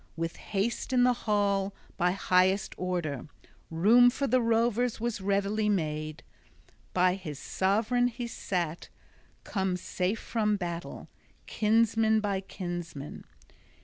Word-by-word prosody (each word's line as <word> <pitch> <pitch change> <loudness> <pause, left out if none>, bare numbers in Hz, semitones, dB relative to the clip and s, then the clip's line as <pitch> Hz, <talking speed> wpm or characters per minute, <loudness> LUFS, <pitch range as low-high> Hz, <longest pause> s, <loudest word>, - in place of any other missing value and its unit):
With 165 +1 -3
haste 215 +5 -2
in 250 -1 +5
the 250 0 +5 0.2
hall, 200 -1 +1 0.2
by 180 0 +2
highest 190 +1 +2
order, 170 -7 -3 0.4
room 220 +9 +6
for 275 +3 -2
the 255 -1 +3
rovers 230 +1 +1
was 235 -3 -2
readily 200 +2 +1
made. 155 -5 -2 0.7
By 180 0 +3
his 175 -7 -6
sovran 220 - +1
he 240 0 -5
sat, 175 -7 -3 0.5
come 190 -2 -1
safe 185 +3 -2
from 210 -3 0
battle, 170 -2 -5 0.4
kinsman 220 0 +3
by 200 -2 -1
kinsman. 175 -6 -6
195 Hz, 115 wpm, -29 LUFS, 180-225 Hz, 0.7 s, room